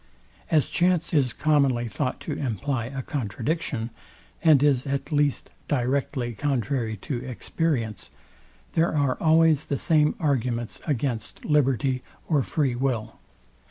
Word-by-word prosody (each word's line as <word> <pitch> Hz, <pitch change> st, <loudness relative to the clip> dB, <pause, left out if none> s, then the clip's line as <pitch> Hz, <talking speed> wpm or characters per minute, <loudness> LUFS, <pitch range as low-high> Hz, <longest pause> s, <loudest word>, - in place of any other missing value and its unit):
As 155 Hz, -4 st, +2 dB
chance 175 Hz, -2 st, +2 dB
is 135 Hz, -5 st, +3 dB
commonly 140 Hz, -4 st, +2 dB
thought 105 Hz, -, -2 dB
to -, -, -5 dB
imply 125 Hz, -1 st, -2 dB
a 135 Hz, 0 st, -5 dB
contradiction, 130 Hz, 0 st, -2 dB, 0.5 s
and 150 Hz, -4 st, +6 dB
is 140 Hz, -3 st, +3 dB
at 140 Hz, +2 st, -2 dB
least 145 Hz, -2 st, +1 dB, 0.2 s
directly 130 Hz, -2 st, -1 dB
contrary 120 Hz, -3 st, -1 dB
to 125 Hz, -4 st, -3 dB
experience, 130 Hz, -2 st, -2 dB, 0.6 s
there 165 Hz, 0 st, +2 dB
are 140 Hz, -3 st, +2 dB
always 160 Hz, -2 st, +4 dB
the 140 Hz, -, -1 dB
same 150 Hz, 0 st, +3 dB
arguments 120 Hz, -6 st, -1 dB
against 120 Hz, -6 st, -2 dB
liberty 135 Hz, -3 st, +2 dB, 0.3 s
or 150 Hz, -4 st, +3 dB
free 135 Hz, -1 st, 0 dB
will. 120 Hz, -3 st, -2 dB
135 Hz, 125 wpm, -25 LUFS, 120-150 Hz, 0.6 s, and